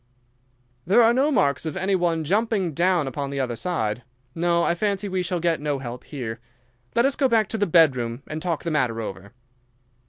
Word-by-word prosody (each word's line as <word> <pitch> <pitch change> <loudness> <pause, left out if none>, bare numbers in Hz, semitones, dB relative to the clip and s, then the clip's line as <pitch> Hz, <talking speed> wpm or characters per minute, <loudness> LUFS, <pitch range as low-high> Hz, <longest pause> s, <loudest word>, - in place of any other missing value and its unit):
"There 210 - +5
are 230 +1 +5
no 270 +4 +2
marks 140 - +2
of 160 +3 -4
any 190 +1 0
one 170 -3 +1
jumping 200 0 0
down 175 -1 +2
upon 140 +1 -4
the 140 0 -4
other 125 -3 -1
side. 115 -8 -2 0.3
No, 170 0 +1
I - - +2
fancy 200 +2 -1
we 185 -1 -1
shall 180 0 -2
get 165 -2 0
no 145 -1 -1
help 125 -2 -7
here. 120 -6 -6 0.6
Let 235 - +4
us 275 0 +2
go 275 - +2
back 225 -4 +2
to 225 - -2
the 205 - +2
bedroom 130 -7 +3
and 155 +1 -6
talk 170 -3 -2
the 170 - -2
matter 125 -6 0
over." 100 -2 -7
165 Hz, 200 wpm, -24 LUFS, 135-190 Hz, 0.6 s, There